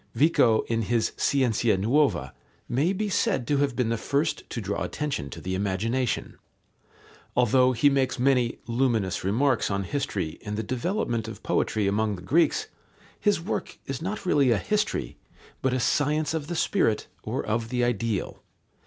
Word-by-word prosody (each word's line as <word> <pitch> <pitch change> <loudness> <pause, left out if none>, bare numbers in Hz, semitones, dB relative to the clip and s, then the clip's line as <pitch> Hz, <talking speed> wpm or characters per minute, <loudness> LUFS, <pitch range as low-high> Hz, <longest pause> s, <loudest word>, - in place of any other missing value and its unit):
Vico, 130 -7 +4
in 115 0 -1
his 115 +1 0
Scienza 120 -6 +2
nuova, 135 +10 +1 0.3
may 140 +9 +1
be 210 +2 -1
said 135 -9 +1
to 145 +3 +1
have 140 -2 +1
been 125 -3 0
the 115 - 0
first 140 +3 -1
to - - -4
draw - - -3
attention 145 - -3
to - - -8
the 95 - -4
imagination. 105 +6 -1 1.0
Although 125 +1 +4
he 125 +4 +3
makes 135 -2 +2
many 125 -2 +2
luminous 115 -6 0
remarks 120 +6 +2
on 100 -1 -1
history 95 - -3
and 105 0 -4
the 110 - -1
development 120 - -2
of 110 -3 -9
poetry 105 -2 0
among 105 +1 +1
the 90 - -10
Greeks, 170 - +2 0.5
his 205 -4 +2
work 175 +6 -4
is 135 +1 -4
not 195 +4 -4
really 145 -7 +3
a 115 - +4
history, 210 - -1 0.4
but 130 - +1
a 130 - 0
science 150 +5 +1
of 155 -3 -3
the 175 - -3
spirit 160 - +1 0.2
or - - -3
of 110 +1 -1
the 125 0 0
ideal. 115 -3 -1
125 Hz, 165 wpm, -26 LUFS, 110-145 Hz, 1.0 s, Vico